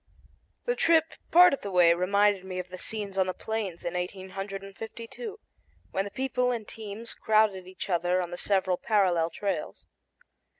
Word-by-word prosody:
The 485 - +1
trip 325 -5 +3 0.2
part 355 0 +8
of 275 - -2
the 200 - -5
way 175 -3 +6
reminded 200 +2 +2
me 185 -1 -6
of 180 0 -4
the 185 0 -8
scenes 205 -3 -3
on 190 - +3
the 185 - -2
Plains 215 -6 -4
in 170 - -2
1852, 195 - -6 0.5
when 195 - 0
the - - -5
people 250 +1 0
and 235 -4 -3
teams 220 +1 -7
crowded 215 -4 +2
each 185 - -7
other 180 0 +1
on 175 -1 -3
the - - -4
several 190 -2 +1
parallel 180 -7 +2
trails. 200 +4 -4
195 Hz, 165 wpm, -28 LUFS, 185-220 Hz, 0.5 s, part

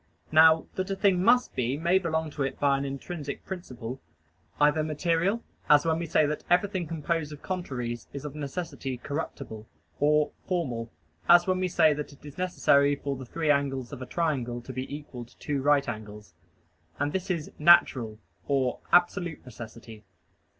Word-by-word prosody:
Now 160 +1 +6
that 185 +1 -3
a 195 - -1
thing 195 -2 +3
must 245 +3 +4
be 125 +2 0
may 170 +4 +3
belong 160 -3 -2
to 145 - -6
it 135 -1 -2
by 140 -1 +3
an 135 +1 -2
intrinsic 140 +2 -6
principle 130 -9 -7 0.6
either 150 +1 +4
material, 170 +7 0 0.3
as 150 0 +6
when 160 0 +1
we 170 - -3
say 155 -1 +3
that 150 +1 -3
everything 180 -1 +1
composed 165 -1 -2
of 150 - -10
contraries 125 -11 -4
is 140 +1 -7
of 145 - -5
necessity 145 -3 -5
corruptible 125 -6 -6 0.3
or 150 +1 +3 0.2
formal, 125 - -2 0.4
as 175 0 +8
when 185 -1 +1
we 185 - +1
say 165 -3 +4
that 150 0 -6
it 145 - -18
is 145 +2 -10
necessary 145 -6 +3
for 140 0 -4
the 130 -1 -9
three 160 +2 +1
angles 135 -3 -1
of - - -7
a 130 - -6
triangle 130 -8 -1
to 130 - -8
be 130 +2 -5
equal 145 -4 -7
to 120 - -19
two 145 -2 -2
right 145 0 +3
angles. 105 -2 -7 0.6
And 145 +1 -1
this 190 +1 -3
is 170 -5 -2
"natural" 140 -9 +5 0.3
and 135 -3 +2 0.2
"absolute 175 -2 +2
necessity." 115 -2 -10
150 Hz, 175 wpm, -28 LUFS, 130-170 Hz, 0.6 s, as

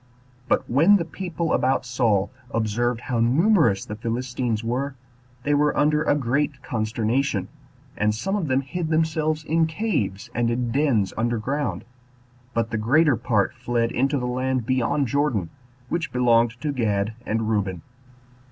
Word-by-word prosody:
But - - +1
when 160 +11 +5
the 175 -4 +1
people 170 -1 -3
about 130 0 +1
Saul 120 -5 +1 0.2
observed 115 +2 -1
how 120 -3 -2
numerous 150 - +3
the 105 - -6
Philistines 120 0 -2
were, 130 +4 -2 0.5
they 145 - +1
were 145 0 +2
under 150 +1 +3
a 145 - +2
great 140 +1 -1
consternation; 110 0 -1 0.5
and 105 0 +1
some 195 - -2
of 190 -6 -1
them 130 0 +2
hid 160 +5 -4
themselves 155 -1 0
in 160 +1 +2
caves 140 - -2
and 120 -1 +1
in 120 0 -1
dens 125 -8 +1
under 120 +1 0
ground, 135 +1 -2 0.7
but 115 0 0
the 110 - -1
greater 145 +6 +4
part 110 -3 0
fled 120 -1 -1
into 135 +3 +1
the 125 - -2
land 130 0 -1
beyond 130 +3 +1
Jordan, 125 - 0 0.4
which 170 +3 -2
belonged 120 -1 +3
to 150 - -1
Gad 105 -4 0
and 110 -1 -1
Reuben. 100 -6 -1
125 Hz, 150 wpm, -24 LUFS, 115-150 Hz, 0.7 s, when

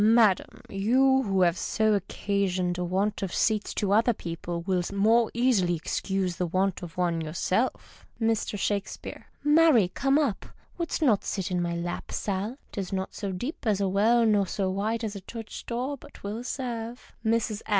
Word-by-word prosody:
— - - +4
Madam, 220 -3 +3
you 265 +7 +3
wlio 190 -2 +3
have 170 -1 +2
so 220 +3 0
often - - +4
occasioned 185 -2 -1
a - - 0
want 195 +4 0
of 195 -3 -2
seats 215 -2 +1
to 200 -2 -1
other 225 +3 +4
people, 170 -2 -5
will 185 0 +1
the 190 +3 -5
more 225 +3 +4
easily 225 -8 +3
excuse 185 +2 -2
the 180 - 0
want 185 +2 0
of 175 -1 -9
one 170 -2 +1
yourself. 185 +9 -2 0.2
Mr. 225 -2 0
Shakespeaue. 200 0 -3 0.2
— - - -35
Marry 295 - +5
come 275 +8 +2
up! 280 -10 0 0.3
ANOuldst 335 -1 -1
not 225 -9 +3
sit 190 -2 -3
in 180 -1 +1
my 170 0 -1
lajj, 175 +1 -4
Sal? 205 +5 -2
'Tis 195 -3 -4
not 190 -1 -3
so 200 -3 -4
deep 245 - -5
as 205 -2 +2
a 200 - +1
well 220 +5 +4
nor 205 -3 +3
so 190 0 -1
wide 215 +4 -1
as 215 -2 -3
a 200 - -6
church 225 +3 -8
door, 250 +4 -2
but - - -15
'twill 210 +4 -5
serve. 240 -2 -5
Mrs. 220 -2 0
200 Hz, 190 wpm, -27 LUFS, 185-230 Hz, 0.3 s, Marry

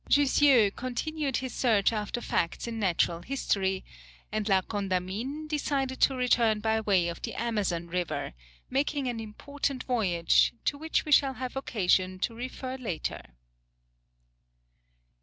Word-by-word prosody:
Jussieu 275 -6 +5
continued 275 +3 -2
his 260 -1 -4
search 225 -4 +2
after 215 +2 -3
facts 165 - -1
in 230 -1 -4
natural 175 -3 +1
history, 190 -8 -1 0.5
and 215 0 -1
La 190 -1 +4
Condamine 205 +9 -3
decided 280 -3 -1
to 270 - +4
return 235 -4 +3
by 220 +1 +1
way 195 -5 +2
of 170 -1 -5
the - - -5
Amazon 205 -7 -1
River, 175 - -3 0.3
making 280 +1 0
an 240 -2 -2
important 270 +5 -4
voyage, 190 -7 +2
to - - +1
which 320 +1 0
we 305 - -4
shall 275 -2 +5
have 255 0 -5
occasion 185 -7 +1
to 215 +5 -2
refer 255 +2 -5
later. 215 -11 -4
230 Hz, 135 wpm, -28 LUFS, 195-265 Hz, 0.5 s, Jussieu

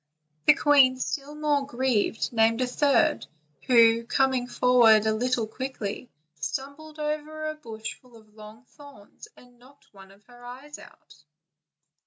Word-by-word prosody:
The 295 - +7
queen, 275 -4 +4
still 280 +3 -5
more 300 -2 0
grieved, 245 -4 -1
named 225 0 +2
a - - +2
third, 265 - +1 0.4
who, 230 -2 +5
coming 260 0 0
forward 235 -4 +4
a 220 - +1
little 245 +1 -1
quickly, 245 -1 -6 0.3
stumbled 285 - -6
over 305 +1 -5
a 310 - -3
bush 225 -7 -8
full 245 -2 -19
of 215 -1 -22
long 215 +3 -14
thorns 285 - -16
and 245 -1 -20
knocked 275 +3 -22
one 195 -1 -16
of 200 +1 -21
her 245 +1 -18
eyes 265 +5 -11
out. - - -19
250 Hz, 145 wpm, -25 LUFS, 225-285 Hz, 0.4 s, The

